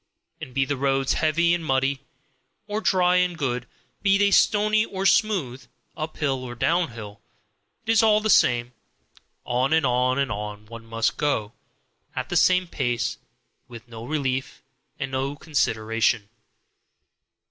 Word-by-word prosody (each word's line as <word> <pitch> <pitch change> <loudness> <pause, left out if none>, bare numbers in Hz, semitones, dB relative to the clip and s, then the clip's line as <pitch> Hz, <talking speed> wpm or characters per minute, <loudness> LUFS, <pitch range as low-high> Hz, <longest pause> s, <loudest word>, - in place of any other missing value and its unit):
And 130 -5 -9
be 135 -1 +2
the 140 +1 -2
roads 135 0 +1
heavy 170 +2 +2
and 175 -1 -1
muddy, 135 -1 0 0.7
or 210 +1 -3
dry 180 -3 +3
and 180 -1 +1
good; 125 -4 -2 0.3
be 195 -1 +3
they 200 0 +3
stony 215 +1 +3
or 195 -3 -4
smooth, 190 - +1 0.3
uphill 150 -4 -2
or 120 -1 -7
downhill, 115 - -2 0.6
it 225 - +1
is 225 -1 +5
all 215 -1 +4
the 215 - -2
same 120 0 +3 0.7
on, 125 +4 +1
on, 130 +1 +1
on, 105 0 -6
one 115 +1 -11
must 115 0 -1
go, 115 -8 -1 0.6
at - - -4
the - - -3
same 185 0 +4
pace, 120 -8 -2 0.5
with 120 0 -12
no 115 -1 -9
relief 130 -1 -3 0.3
and 135 -4 -4
no 135 +2 -2
consideration. 115 -7 0
135 Hz, 135 wpm, -24 LUFS, 120-175 Hz, 0.7 s, is